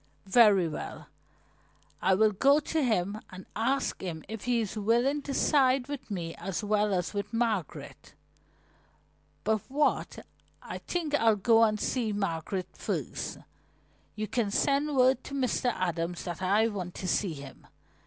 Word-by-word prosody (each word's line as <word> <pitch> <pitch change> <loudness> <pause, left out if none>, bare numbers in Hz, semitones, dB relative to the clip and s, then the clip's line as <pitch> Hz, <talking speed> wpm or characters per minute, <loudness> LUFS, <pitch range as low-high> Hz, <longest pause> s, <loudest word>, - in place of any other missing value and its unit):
"Very 200 -3 +5
well, 155 - -7 0.9
I 190 0 +4
will 215 +2 +4
go 275 +8 +4
to 310 0 -1
him 215 -3 0
and 185 0 -10
ask 260 +5 0
him 165 -4 -5
if 220 -1 -7
he 245 -1 +2
is 220 -2 -3
willing 240 +7 +2
to 280 - -6
side 265 -3 +3
with 285 -4 -6
me 170 -5 -4
as 195 +4 -3
well 210 0 +1
as 180 0 -1
with 200 0 -3
Margaret. 225 -8 -3 1.3
But 215 -1 +1
wait, 290 +2 0 0.4
I - - -7
think 330 -4 -3
I'll 225 -6 +4
go 225 +3 +4
and 215 -1 +2
see 225 -2 -1
Margaret 185 -1 -2
first. - - -4 0.8
You 215 0 -3
can 230 -3 0
send 280 +6 +1
word 255 +1 +4
to 280 - -6
Mr. 255 -2 +1
Adams 175 -3 -2
that 175 0 -5
I 205 +4 +3
want 185 -5 -5
to 185 - -5
see 180 -1 0
him. 140 -2 -11
215 Hz, 155 wpm, -29 LUFS, 190-255 Hz, 1.3 s, Very